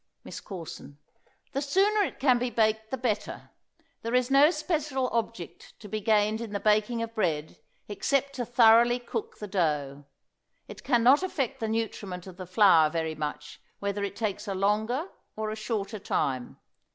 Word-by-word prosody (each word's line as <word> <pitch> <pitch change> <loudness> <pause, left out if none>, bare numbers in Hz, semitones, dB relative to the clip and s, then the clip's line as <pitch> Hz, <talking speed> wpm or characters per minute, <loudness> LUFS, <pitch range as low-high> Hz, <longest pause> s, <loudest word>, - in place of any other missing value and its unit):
MISS - - -8
CORSON. 165 -6 -9 0.5
The 275 - -2
sooner 395 +9 +2
it 395 - -2
can 255 -3 +4
be 250 +1 -1
baked 220 -1 +1
the 265 - -3
better. 225 -4 -3 0.5
There 230 +2 -2
is 250 +1 +1
no 280 +2 +7
special 300 -6 -1
object 230 -6 -5
to 210 - -10
be 215 +1 -4
gained 215 +1 +2
in 225 -3 -6
the 200 - -1
baking 215 +3 +2
of 230 0 -6
bread 160 -8 -2 0.3
except 275 +7 0
to 245 - -1
thoroughly 235 0 +5
cook 430 - -6
the 210 - -6
dough. 150 -7 -1 0.6
It - - -11
can 240 -4 +2
not 270 +6 +6
affect 295 -10 -2
the 225 - -2
nutriment 210 -5 -3
of 185 -2 -11
the 185 -2 -8
flour 180 -5 +5
very 160 0 -2
much 150 -1 -6 0.2
whether 200 0 -3
it 200 0 -4
takes 210 -1 -3
a 195 - -2
longer 215 - 0 0.3
or 215 0 -3
a - - -4
shorter 215 -1 -3
time. 130 -9 -2
220 Hz, 175 wpm, -28 LUFS, 195-250 Hz, 0.6 s, no